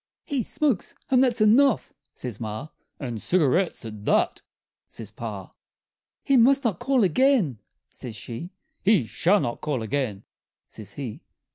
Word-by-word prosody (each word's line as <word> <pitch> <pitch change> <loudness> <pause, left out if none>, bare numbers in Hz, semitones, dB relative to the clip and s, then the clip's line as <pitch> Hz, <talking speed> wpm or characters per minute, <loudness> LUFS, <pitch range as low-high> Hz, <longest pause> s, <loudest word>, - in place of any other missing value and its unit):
"He 280 -5 -1
smokes 260 -1 -1 0.2
and 260 0 +5
that's 240 -3 +2
enough," 235 +4 +4 0.2
says 120 -5 -6
Ma 110 +6 -5 0.3
"And 120 -6 -5
cigarettes, 175 -3 +1
at 105 -2 -8
that!" - - +2 0.5
says 110 -3 -7
Pa. 105 -4 -7 0.7
"He 275 - +4
must 270 +4 +5
not 215 -8 0
call 270 -4 +2
again," 190 - +3 0.3
says 120 -4 -8
she 120 - -6 0.3
"He 195 - +4
shall 185 - +2
not 120 - -3
call 140 -6 -2
again!" 110 -5 -2 0.4
says 105 -2 -9
he. 130 -6 -6
150 Hz, 140 wpm, -25 LUFS, -, 0.7 s, and